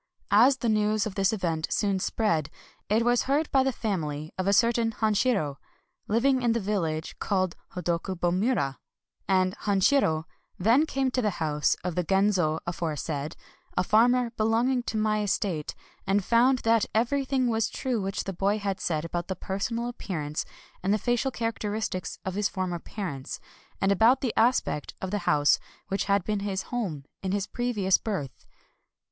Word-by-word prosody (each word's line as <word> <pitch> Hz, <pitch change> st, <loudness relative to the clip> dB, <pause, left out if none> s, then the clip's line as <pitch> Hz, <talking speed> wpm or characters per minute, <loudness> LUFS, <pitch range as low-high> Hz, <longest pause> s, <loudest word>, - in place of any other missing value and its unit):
As 250 Hz, +6 st, +6 dB
the 240 Hz, -, -2 dB
news 215 Hz, -1 st, +2 dB
of 215 Hz, -, -4 dB
this 195 Hz, 0 st, +2 dB
event 165 Hz, -7 st, -1 dB
soon 200 Hz, -3 st, +1 dB
spread, 165 Hz, -7 st, 0 dB, 0.4 s
it 225 Hz, +3 st, +2 dB
was 240 Hz, 0 st, +3 dB
heard 295 Hz, +3 st, +1 dB
by 270 Hz, -, +4 dB
the 265 Hz, 0 st, +1 dB
family 155 Hz, -, -3 dB
of 185 Hz, 0 st, -2 dB
a -, -, +4 dB
certain 230 Hz, +1 st, +3 dB
Han 215 Hz, 0 st, +1 dB
shiro, 200 Hz, -, +1 dB, 0.5 s
living 255 Hz, +4 st, +2 dB
in 240 Hz, -2 st, +2 dB
the 235 Hz, -, 0 dB
village 170 Hz, -7 st, -2 dB
called 185 Hz, -3 st, 0 dB, 0.2 s
Hodokubo 175 Hz, 0 st, -1 dB
mura; 185 Hz, -, 0 dB, 0.5 s
and 185 Hz, -1 st, +2 dB
Hanshiro 195 Hz, -, +2 dB, 0.3 s
then 235 Hz, -, +4 dB
came 265 Hz, -2 st, 0 dB
to 255 Hz, -, 0 dB
the 210 Hz, -5 st, -1 dB
house 150 Hz, -2 st, +1 dB
of 180 Hz, -1 st, -2 dB
the 180 Hz, -, 0 dB
Genzo 190 Hz, -4 st, +2 dB
aforesaid, 155 Hz, -3 st, -3 dB, 0.4 s
a -, -, +3 dB
farmer 240 Hz, +4 st, +3 dB
belonging 230 Hz, +3 st, +1 dB
to 230 Hz, -, -3 dB
my 215 Hz, 0 st, +1 dB
estate, 190 Hz, -6 st, -1 dB, 0.3 s
and 195 Hz, 0 st, +2 dB
found 245 Hz, +3 st, +4 dB
that 225 Hz, -1 st, +3 dB
everything 260 Hz, +2 st, +1 dB
was 225 Hz, -2 st, +1 dB
true 250 Hz, -5 st, -2 dB
which 195 Hz, 0 st, -2 dB
the 195 Hz, -, -4 dB
boy 195 Hz, +4 st, +1 dB
had 200 Hz, -2 st, -2 dB
said 155 Hz, -2 st, -1 dB
about 175 Hz, +1 st, -3 dB
the 190 Hz, -, -3 dB
personal 230 Hz, +6 st, -3 dB
ap 245 Hz, -, -10 dB
pearance 150 Hz, -5 st, -3 dB, 0.4 s
and 190 Hz, -, 0 dB
the 210 Hz, -, +4 dB
facial 240 Hz, +4 st, 0 dB
characteristics 220 Hz, -5 st, -3 dB
of 190 Hz, -, -2 dB
his 205 Hz, +1 st, 0 dB
former 185 Hz, -3 st, -3 dB
parents, 165 Hz, -10 st, -6 dB, 0.4 s
and 195 Hz, -, +2 dB
about 225 Hz, +6 st, +4 dB
the 250 Hz, -5 st, -1 dB
aspect 230 Hz, -, +1 dB
of 190 Hz, -, -4 dB
the 205 Hz, -, 0 dB
house 145 Hz, -1 st, +4 dB, 0.3 s
which 195 Hz, -, -1 dB
had 200 Hz, -1 st, +2 dB
been 210 Hz, +1 st, -1 dB
his 200 Hz, -1 st, -2 dB
home 175 Hz, -, -3 dB, 0.2 s
in 190 Hz, -, -2 dB
his 200 Hz, 0 st, 0 dB
previous 210 Hz, -7 st, +1 dB
birth. 190 Hz, -, -5 dB
200 Hz, 170 wpm, -27 LUFS, 180-230 Hz, 0.5 s, As